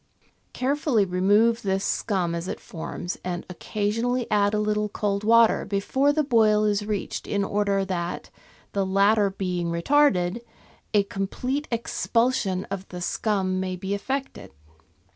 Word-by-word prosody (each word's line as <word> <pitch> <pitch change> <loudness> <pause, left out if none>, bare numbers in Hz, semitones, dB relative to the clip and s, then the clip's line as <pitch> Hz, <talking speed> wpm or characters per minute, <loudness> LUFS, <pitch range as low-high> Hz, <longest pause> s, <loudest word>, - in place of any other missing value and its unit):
Carefully 265 -5 +1
remove 205 +6 +3
this 195 -1 -1
scum 185 -6 0
as 170 +1 -4
it - - -4
forms, 175 +1 -6
and 180 -1 -4
occasionally 230 +7 -1
add 205 0 +3
a - - +1
little 210 0 0
cold 200 0 -2
water 230 +1 +5
before 265 +8 +1
the 305 +1 +1
boil 220 -5 +3
is 210 -1 +1
reached 205 -1 -4
in 200 -1 0
order 200 -1 0
that, 175 -2 -4 0.4
the 200 - 0
latter 200 +2 +3
being 180 -3 -3
retarded, 185 +1 +2 0.5
a 205 -2 +4
complete 250 +9 -3
expulsion 230 -4 0
of 195 -1 -5
the 180 - -8
scum 185 0 -1
may 185 -1 -2
be 190 +2 -4
effected. 265 - -4
205 Hz, 140 wpm, -25 LUFS, 190-230 Hz, 0.5 s, water